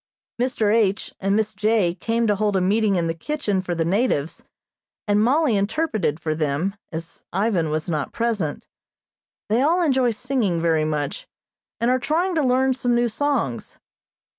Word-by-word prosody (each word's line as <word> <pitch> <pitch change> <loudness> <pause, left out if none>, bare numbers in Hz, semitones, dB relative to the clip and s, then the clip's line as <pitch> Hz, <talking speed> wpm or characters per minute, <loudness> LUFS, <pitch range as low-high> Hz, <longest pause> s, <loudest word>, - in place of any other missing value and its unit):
Mr. 225 -4 +1
H. 205 -3 +1
and 195 +1 +1
Miss 215 0 0
J. 210 -3 +1
came 230 +5 -1
to 210 -2 +2
hold 205 0 0
a - - +3
meeting 200 +2 +2
in 170 -2 +1
the 165 - -1
kitchen 205 - -2
for 180 -2 -3
the 165 -1 0
natives, 175 - 0 0.6
and 205 0 +3
Mollie 270 0 +3
interpreted 200 - 0
for 155 -2 -2
them, 155 +5 -1 0.2
as 165 0 -7
Ivan 195 -6 +1
was 155 +1 -2
not 155 -4 -2
present. 215 -10 -2 0.8
They 225 +4 +2
all 340 +5 +3
enjoy 265 -5 +3
singing 235 -6 -1
very 165 -2 +2
much, 155 - -3 0.5
and 235 +2 +2
are 255 - +2
trying 325 +9 0
to 320 - +1
learn 260 +1 +3
some 245 -1 0
new 240 0 +2
songs. 235 - -2
210 Hz, 165 wpm, -23 LUFS, 170-250 Hz, 0.8 s, a